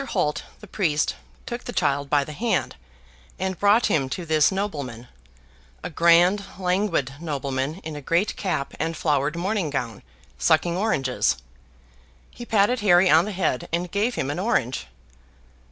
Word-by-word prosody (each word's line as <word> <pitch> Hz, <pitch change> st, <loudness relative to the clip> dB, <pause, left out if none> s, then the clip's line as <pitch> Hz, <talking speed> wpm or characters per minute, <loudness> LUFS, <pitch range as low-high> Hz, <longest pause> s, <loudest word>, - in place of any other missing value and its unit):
Holt, 175 Hz, -, -1 dB, 0.2 s
the -, -, -10 dB
priest, 160 Hz, -7 st, 0 dB, 0.3 s
took 240 Hz, 0 st, -6 dB
the -, -, -4 dB
child 140 Hz, -7 st, 0 dB
by 145 Hz, -1 st, +3 dB
the 150 Hz, -, -8 dB
hand, 225 Hz, +8 st, -1 dB, 0.6 s
and 190 Hz, -1 st, -3 dB
brought 205 Hz, +4 st, +4 dB
him 135 Hz, -4 st, +1 dB
to 175 Hz, +6 st, -4 dB
this 155 Hz, 0 st, +3 dB
nobleman, 145 Hz, -, -4 dB, 0.8 s
a -, -, -5 dB
grand 170 Hz, +5 st, +4 dB
languid 180 Hz, -7 st, 0 dB
nobleman 140 Hz, -2 st, -3 dB
in 155 Hz, -1 st, -6 dB
a 145 Hz, -, -6 dB
great 170 Hz, +8 st, 0 dB
cap 180 Hz, -8 st, -2 dB
and 165 Hz, 0 st, -2 dB
flowered 150 Hz, 0 st, 0 dB
morning 185 Hz, -1 st, -1 dB
gown, 120 Hz, -6 st, -4 dB, 0.4 s
sucking 170 Hz, +2 st, +2 dB
oranges. 135 Hz, -, +1 dB, 0.9 s
He 240 Hz, -, -10 dB
patted 215 Hz, +3 st, +3 dB
Harry 185 Hz, -3 st, +5 dB
on 160 Hz, +3 st, +6 dB
the 210 Hz, -, -4 dB
head 180 Hz, -9 st, -1 dB
and 175 Hz, +1 st, -2 dB
gave 215 Hz, +5 st, 0 dB
him 135 Hz, -, -2 dB
an 150 Hz, -, -4 dB
orange. 135 Hz, -, 0 dB
170 Hz, 155 wpm, -24 LUFS, 145-200 Hz, 0.9 s, on